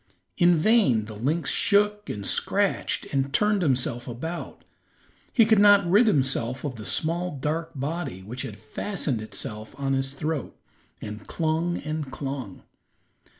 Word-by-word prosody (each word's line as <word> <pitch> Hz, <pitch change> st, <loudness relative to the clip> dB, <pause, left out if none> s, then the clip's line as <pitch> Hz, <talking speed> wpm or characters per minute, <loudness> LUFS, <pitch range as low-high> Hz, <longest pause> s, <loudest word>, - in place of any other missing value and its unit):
In 175 Hz, 0 st, +5 dB
vain 160 Hz, -, +3 dB
the 110 Hz, 0 st, -9 dB
lynx 145 Hz, +10 st, 0 dB
shook 210 Hz, 0 st, +2 dB
and 100 Hz, -1 st, -4 dB
scratched -, -, 0 dB
and 135 Hz, 0 st, 0 dB
turned 210 Hz, +5 st, +2 dB
himself 125 Hz, -5 st, 0 dB
about. 160 Hz, +8 st, -6 dB, 0.7 s
He 230 Hz, -, +5 dB
could 220 Hz, -1 st, +4 dB
not 205 Hz, -2 st, +6 dB
rid 205 Hz, +7 st, +5 dB
himself 130 Hz, -, +1 dB
of 145 Hz, -4 st, -3 dB
the 110 Hz, -3 st, -7 dB
small 170 Hz, -, -1 dB
dark 160 Hz, +4 st, -2 dB
body 140 Hz, -, -4 dB
which 120 Hz, +6 st, -6 dB
had 105 Hz, -, -6 dB
fastened 125 Hz, -, -3 dB
itself 110 Hz, +1 st, -6 dB
in 135 Hz, -1 st, 0 dB
his 135 Hz, 0 st, -1 dB
throat 150 Hz, -1 st, -3 dB, 0.4 s
and 105 Hz, 0 st, -7 dB
clung 165 Hz, +2 st, 0 dB
and 155 Hz, -2 st, -4 dB
clung. 135 Hz, -7 st, -6 dB
140 Hz, 145 wpm, -26 LUFS, 120-175 Hz, 0.7 s, not